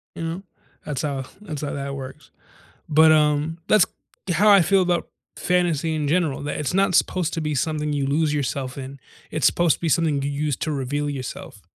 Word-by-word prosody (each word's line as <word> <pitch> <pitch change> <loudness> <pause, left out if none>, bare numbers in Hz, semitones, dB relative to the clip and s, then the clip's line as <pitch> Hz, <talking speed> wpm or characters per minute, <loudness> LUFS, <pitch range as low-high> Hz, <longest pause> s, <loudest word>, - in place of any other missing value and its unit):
You - - -5
know? 165 +4 -4 0.4
That's 145 -4 -3
how 140 -3 -2 0.2
that's 155 -9 -6
how 145 - -3
that 140 0 -4
works. 135 -1 -9 0.6
But, 155 +1 +6
um, 150 +1 +2
that's 215 -3 +5 0.5
how 200 +6 +4
I 200 -2 +8
feel 190 +3 +3
about 175 -2 0 0.3
fantasy 170 -3 0
in 150 -2 -1
general, 160 -3 0
that 145 - -3
it's 150 - -2
not 195 -1 +2
supposed 180 -2 +1
to 165 - -2
be 150 -1 -2
something 150 +1 -1
you 140 -2 -1
lose 150 +2 +1
yourself 135 -2 -3
in, 135 0 -8 0.3
it's 155 -5 -1
supposed 170 +2 +3
to - - -34
be 165 - 0
something 155 -3 +1
you 140 - -2
use 145 0 -1
to 155 - -2
reveal 145 +1 -2
yourself. 130 -6 -7
150 Hz, 200 wpm, -23 LUFS, 140-165 Hz, 0.6 s, I